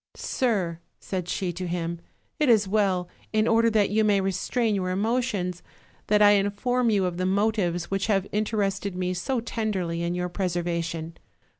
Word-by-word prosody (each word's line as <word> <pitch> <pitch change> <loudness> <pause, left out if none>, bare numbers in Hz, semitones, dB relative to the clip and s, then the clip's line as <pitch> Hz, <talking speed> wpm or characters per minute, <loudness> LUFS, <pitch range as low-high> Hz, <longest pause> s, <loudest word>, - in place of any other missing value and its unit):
"Sir," 195 - -1 0.2
said 180 -2 -4
she 180 -2 -2
to 180 +1 -4
him, 170 -1 -3 0.4
"it 300 -4 +3
is 215 -4 +5
well, 190 -3 +1 0.2
in 215 0 +2
order 230 0 +4
that 210 -3 +2
you 220 +1 +3
may 205 -2 +3
restrain 195 +4 0
your 185 -2 -1
emo 220 +7 +1
tions, 180 -7 -3 0.5
that 210 0 +4
I 205 - +8
inform 205 +5 +1
you 200 -3 +2
of 175 -1 -2
the 185 0 0
motives 195 -4 0
which 195 +1 0
have 195 -3 +2
inter 215 +1 -1
ested 195 -1 -1
me 180 0 -1
so 240 +8 -1
tenderly 195 -7 -2
in 170 +1 -1
your 180 0 -1
preservation. 170 -3 -3
195 Hz, 175 wpm, -26 LUFS, 180-215 Hz, 0.5 s, I